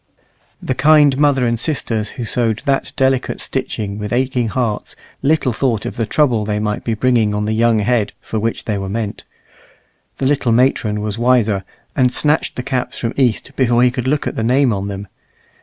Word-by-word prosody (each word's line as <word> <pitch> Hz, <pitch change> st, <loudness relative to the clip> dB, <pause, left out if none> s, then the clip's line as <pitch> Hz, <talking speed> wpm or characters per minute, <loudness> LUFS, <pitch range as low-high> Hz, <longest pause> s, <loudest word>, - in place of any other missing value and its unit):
The -, -, -1 dB
kind 145 Hz, 0 st, +5 dB
mother 140 Hz, -4 st, +3 dB
and 115 Hz, -1 st, 0 dB
sisters 115 Hz, -7 st, -1 dB
who 120 Hz, -, -3 dB
sewed 115 Hz, -1 st, -1 dB
that 140 Hz, -2 st, 0 dB
delicate 130 Hz, -1 st, +1 dB
stitching 100 Hz, -1 st, -3 dB
with 105 Hz, 0 st, -5 dB
aching 125 Hz, -1 st, 0 dB
hearts 110 Hz, -2 st, -2 dB, 0.3 s
little 140 Hz, -3 st, +2 dB
thought 115 Hz, -3 st, -1 dB
of -, -, -4 dB
the 115 Hz, -2 st, -2 dB
trouble 125 Hz, -8 st, +2 dB
they 105 Hz, 0 st, -2 dB
might 105 Hz, 0 st, -2 dB
be 115 Hz, -, -1 dB
bringing 110 Hz, -3 st, +2 dB
on 105 Hz, 0 st, -1 dB
the 110 Hz, -, -1 dB
young 115 Hz, 0 st, +3 dB
head 110 Hz, 0 st, +1 dB
for 110 Hz, -, -4 dB
which 115 Hz, +2 st, -2 dB
they 105 Hz, -3 st, -1 dB
were 95 Hz, 0 st, -4 dB
meant. 105 Hz, 0 st, -4 dB, 0.9 s
The 135 Hz, -, -2 dB
little 135 Hz, -3 st, +1 dB
matron 115 Hz, -3 st, +2 dB
was 105 Hz, +1 st, -3 dB
wiser, 115 Hz, -5 st, +2 dB, 0.3 s
and 125 Hz, -2 st, +3 dB
snatched 150 Hz, +3 st, +1 dB
the 125 Hz, -, -4 dB
caps 125 Hz, 0 st, -2 dB
from 115 Hz, 0 st, -2 dB
East 125 Hz, -5 st, 0 dB
before 120 Hz, -2 st, +3 dB
he 125 Hz, -, +4 dB
could 125 Hz, 0 st, -3 dB
look 145 Hz, +2 st, 0 dB
at -, -, -3 dB
the -, -, -2 dB
name 125 Hz, +1 st, +3 dB
on 100 Hz, 0 st, -3 dB
them. 100 Hz, 0 st, -6 dB
120 Hz, 195 wpm, -18 LUFS, 110-130 Hz, 0.9 s, kind